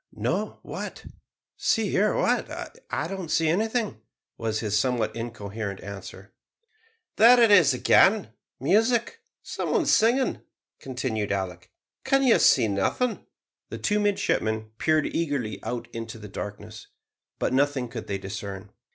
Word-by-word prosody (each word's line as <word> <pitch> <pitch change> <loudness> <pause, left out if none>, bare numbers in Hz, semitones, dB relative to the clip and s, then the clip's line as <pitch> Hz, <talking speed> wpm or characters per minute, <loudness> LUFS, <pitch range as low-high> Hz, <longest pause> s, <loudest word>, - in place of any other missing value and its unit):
"No - - -2
what? - - -7 0.5
see, - - +1
hear - - +2
what? - - +1 0.4
I 155 - -2
don't 190 -2 -6
see 160 +1 +2
anything," 215 - -1 0.3
was 110 -1 -2
his 105 -2 -1
somewhat 110 -1 0
incoherent 110 -3 -5
answer. 100 0 -9 0.8
"There 240 +3 +8
it 230 -3 +6
is 165 -10 +6
again; 195 - +4 0.3
music 235 - +2 0.2
some - - -4
one - - +2
singing," 240 +4 +2 0.4
continued 125 -6 -3
Alick. 90 -2 -4 0.3
"Can 275 0 +2
you 250 -3 +5
see 110 - +5
nothing?" 105 - -1 0.4
The - - -6
two 210 0 0
midshipmen 110 - 0
peered 155 -2 +2
eagerly 135 -11 -2
out 120 -1 -4
into 115 0 -6
the 105 -1 -9
darkness, 105 +2 -8 0.5
but - - -1
nothing 135 -1 +1
could 115 -1 -7
they 100 - -2
discern. 100 0 -7
120 Hz, 135 wpm, -26 LUFS, -, 0.8 s, There